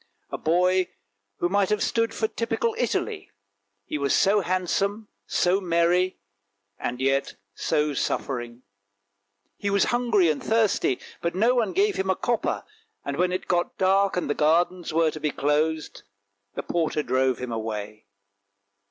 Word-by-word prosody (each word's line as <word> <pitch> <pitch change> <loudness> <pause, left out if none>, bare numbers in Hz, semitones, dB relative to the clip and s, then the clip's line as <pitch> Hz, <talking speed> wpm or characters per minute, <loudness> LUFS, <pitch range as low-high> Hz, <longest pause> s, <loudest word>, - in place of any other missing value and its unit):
A - - -3
boy 180 +3 +2 0.5
who 175 - +1
might 200 +1 +1
have 210 -1 +1
stood 230 -1 +1
for 225 -1 -1
typical 435 - -1
Italy; 435 -4 -2 0.6
he 150 - -3
was 140 -1 +2
so 205 +2 +4
handsome, 195 +4 -1 0.2
so 185 +3 +2
merry, 175 +1 +2 0.6
and 125 +1 -3
yet 135 +1 0 0.2
so 150 +3 0
suffering. 120 -2 -3 0.9
He 200 - -2
was 200 0 +3
hungry 235 -7 +3
and 150 - -4
thirsty, 220 - +2 0.2
but 170 0 -2
no 230 +6 +3
one 230 -5 +1
gave 405 +2 +2
him 190 0 -1
a 190 - +3
copper, 240 +3 -1 0.4
and 140 0 -3
when 180 0 +2
it 185 - -3
got 175 -1 0
dark 195 0 +3
and 180 - -1
the 145 - +1
gardens 170 +4 +1
were 160 0 +2
to 155 - -7
be 150 - 0
closed, 150 +2 -1 0.5
the - - -3
porter 160 -3 -1
drove 130 0 +1
him 125 -1 -5
away. 110 -2 -5
175 Hz, 150 wpm, -25 LUFS, 150-200 Hz, 0.9 s, so